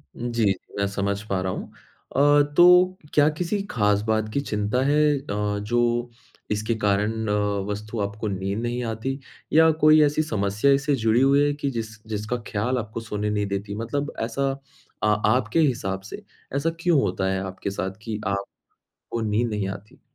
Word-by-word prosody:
जी, 115 -4 +1 0.2
मैं 100 - +1
समझ 100 0 -2
पा 95 -1 0
रहा 95 0 -1
हूँ। - - -6 0.4
अ, 145 +1 +5 0.2
तो 180 +1 +7 0.2
क्या 150 0 +5
किसी 180 +3 -1
ख़ास 105 -3 +2
बात 110 -1 +1
की 140 - +1
चिंता 105 +1 -1
है 145 +1 +3 0.2
अ, - - -14 0.4
जो 120 +2 0 0.4
इसके 110 +2 0
कारण 105 +2 0
अ, 105 - +1 0.4
वस्तु 105 +2 -4
आपको 105 +2 -6
नींद 95 +2 -2
नहीं 120 +1 -2
आती, 115 +5 -3 0.3
या 160 +1 +7
कोई 155 0 +7
ऐसी 150 +2 +1
समस्या 105 +1 +1
इससे 140 +1 +2
जुड़ी 115 +1 +2
हुई 140 +2 +4
है 145 - +1
कि 145 -1 -2
जिस 110 -2 -5
जिसका 105 +3 -3
ख़याल 120 +4 0
आपको 110 -1 -4
सोने 105 -1 -3
नहीं 105 -1 0
देती? 100 +1 -4
मतलब 140 +7 -3
ऐसा 135 +4 -1 0.5
आ 105 0 +4 0.2
आपके 130 +5 0
हिसाब 110 -10 0
से - - -8 0.3
ऐसा 150 +4 +1
क्यों 165 -4 +3
होता 95 +1 -1
है 95 - -1
आपके 95 +1 -5
साथ 95 -1 -3
कि 110 -1 -4
आपको 100 0 -4 0.6
नींद 110 +2 0
नहीं 105 -2 -2
आती? 100 +2 -9
110 Hz, 175 wpm, -24 LUFS, 105-140 Hz, 0.6 s, तो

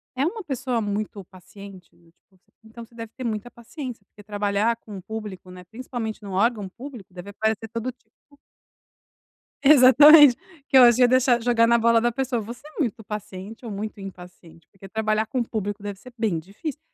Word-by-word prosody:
é 265 +3 0
uma 435 +6 -3
pessoa 260 -5 -2
muito 205 -1 -4
paciente 190 0 -14
do 170 - -26
tipo, 170 - -50
você 180 - -40
então, 225 +1 -11
você 235 0 -24
deve 230 -1 -8
ter 260 - -6
muita 225 0 -3
paciência 240 -2 -9
porque 205 - -18
trabalhar 205 +2 0
com 210 -4 -10
público, 205 -3 -8
né, 180 0 -11
principalmente 225 +1 -6
num 200 - -8
órgão 205 +1 +1
público, 240 -4 -11
deve 180 +2 -9
aparecer 220 +1 -2
todo 230 +3 -4
tipo". 225 -3 -38 1.5
Exatamente. 285 0 +8 0.3
Que 270 - +4
eu 255 - +9
acho 240 0 +6
ia 250 - +7
deixar 250 -1 +3
jogar 230 -1 +3
na 235 - +4
bola 230 0 +3
da 240 +1 +1
pessoa. 255 -1 -2
"Você 235 +6 -10
é 310 - -12
muito 235 -5 -2
paciente 210 +1 -8
ou 225 - -6
muito 205 +1 -6
impaciente? 180 -3 -12
Porque 195 0 -13
trabalhar 215 +1 0
com 255 0 -1
público 205 -2 -5
deve 205 -1 -6
ser 255 - -14
bem 215 -8 0
difícil!". 205 - -7
220 Hz, 190 wpm, -24 LUFS, 200-245 Hz, 1.5 s, eu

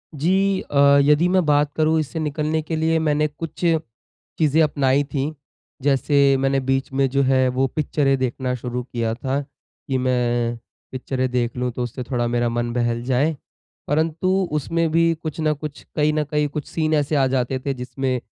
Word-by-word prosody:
जी 190 +6 +1
अ, 140 0 +4
यदि 150 +4 +4
मैं 185 -2 +2
बात 145 -1 +2
करूँ, 160 0 +2
इससे 155 +2 -3
निकलने 155 +1 -1
के 160 +1 -4
लिए 160 +1 +1
मैंने 150 -1 +1
कुछ 160 +3 -6 0.7
चीज़ें 155 0 +3
अपनाई 140 -2 +2
थी। 145 +1 -3 0.5
जैसे 140 0 +3
मैंने 135 0 +1
बीच 135 0 -1
में 135 0 +2
जो 140 +2 +1
है 130 0 +3
वो 130 +1 +1
पिक्चरें 140 -1 0
देखना 130 0 -2
शुरू 125 0 -4
किया 115 -2 -2
था 130 +3 -2
कि 135 -1 -7
मैं 120 -2 0 0.3
पिक्चरें 130 0 -2
देख 120 -1 -1
लूँ, 125 0 -1
तो 125 +1 -4
उससे 120 +1 -5
थोड़ा 120 -1 -1
मेरा 120 0 0
मन 120 0 -2
बहल 120 -1 -1
जाए। 135 +5 +1 0.5
परंतु 160 +4 0 0.2
उसमें 165 +3 0
भी 165 +1 +3
कुछ 155 0 -5
ना 155 -1 +2
कुछ 150 0 -8
कहीं 150 0 +2
न 155 0 +1
कहीं 150 +1 0
कुछ 145 0 -5
सीन 155 -1 -1
ऐसे 150 0 +1
आ 135 -2 +3
जाते 130 0 -1
थे 140 - 0
जिसमें 130 +1 -3
140 Hz, 180 wpm, -22 LUFS, 130-155 Hz, 0.7 s, अ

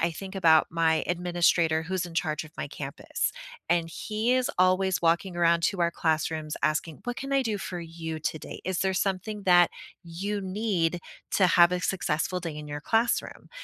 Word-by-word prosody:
I 170 +1 +2
think 190 +4 -8
about 160 -5 +5
my 165 -1 +1
administrator 175 -2 +2
who's 185 +1 -2
in 175 - -10
charge 155 -2 -1
of 155 - -12
my - - -3
campus 140 -1 -3 0.4
and 170 0 +2
he 215 +7 -1
is 255 +2 +1
always 185 +1 +3
walking 170 +2 +1
around 170 -1 +3
to 195 -3 0
our 170 0 +2
classrooms 155 -1 -1
asking, 155 0 -1
"What 245 0 -3
can 275 0 -5
I 275 -1 +3
do 220 -4 -1
for 185 -2 -5
you 165 -1 -6
today? 155 0 -5
Is 185 -1 -1
there 190 0 +1
something 195 +2 -2
that 175 -2 +6 0.3
you 195 +5 -4
need 190 -3 -1 0.4
to 190 - +5
have 175 -1 +6
a 180 - 0
successful 180 -1 -1
day 165 -3 -5
in 150 0 -7
your 145 0 -5
classroom?" 225 +8 0
175 Hz, 185 wpm, -27 LUFS, 160-190 Hz, 0.4 s, that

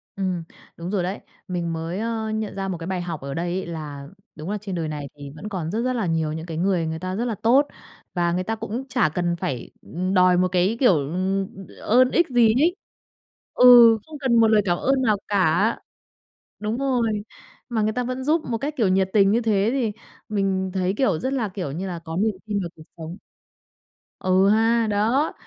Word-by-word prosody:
Ừm, 185 -3 -2 0.3
đúng 170 +2 -6
rồi 195 -4 0
đấy. 190 +4 -3 0.3
Mình 175 -3 -2
mới, 165 +3 -4
ơ, 225 -1 -2
nhận 215 -1 -3
ra 195 0 -3
một 185 -2 -3
cái 165 0 -7
bài 185 -1 -2
học 170 -4 -5
ở 140 0 -5
đây 170 +4 -2
ấy - - -5
là 150 -4 -7 0.3
đúng 155 +4 -7
là 210 - -1
trên 195 -3 -5
đời 165 -2 -2
này 145 -2 -5
thì 145 -1 -9
vẫn 210 +7 -7
còn 175 -4 -4
rất 225 - -1
rất 255 0 0
là 230 -6 -1
nhiều 160 -2 0
những 160 +1 -5
cái 165 -2 -6
người 180 -1 +1
người 160 0 -4
ta 185 +1 -4
rất 230 +4 -1
là 230 -3 -2
tốt. 245 +8 +3 0.5
Và 175 -1 +1
người 180 +2 -1
ta 225 +4 -2
cũng 225 +4 -5
chả 250 -11 +2
cần 175 +2 -1
phải, 130 -7 -4
ừm, 185 +3 -3
đòi 180 -1 +5
một 185 +1 +3
cái 185 +5 +1
kiểu, 250 -8 +5
ừm, 185 +7 -1 0.3
ơn 255 +3 +4
ích 345 -1 +3
gì 235 -3 +4
ấy. 345 +4 +3 0.8
Ừ, 240 -2 +8
không 315 -1 -9
cần 260 -4 +1
một 225 -1 +6
lời 215 -1 +4
cảm 175 -2 +1
ơn 270 0 +1
nào 215 -5 +2
cả! 200 +2 +2 0.8
Đúng 215 +3 -2
rồi. 265 -3 +1 0.7
Mà 230 -3 0
người 215 +1 +1
ta 250 +2 -1
vẫn 255 +1 -4
giúp 310 +3 +2
một 230 - 0
cách, 285 +6 -3
kiểu, 225 - +3
nhiệt 190 0 +2
tình 200 -2 +5
như 235 +3 +2
thế 210 -2 +2
thì 240 -6 0 0.4
mình 195 -2 0
thấy, 185 -1 0
kiểu, 195 -12 +2
rất 260 +9 -2
là, 235 -6 -1
kiểu 185 -7 -5
như 180 +7 -4
là, 175 -2 -5
có 165 0 -6
niềm 210 +1 +1
tin 205 -1 -1
vào 175 - -4
cuộc 160 - -13
sống. 165 +2 -7 1.0
Ừ 185 +1 +3
ha, 225 +2 +3
đó! 225 +9 +1
195 Hz, 225 wpm, -23 LUFS, 175-230 Hz, 1.0 s, Ừ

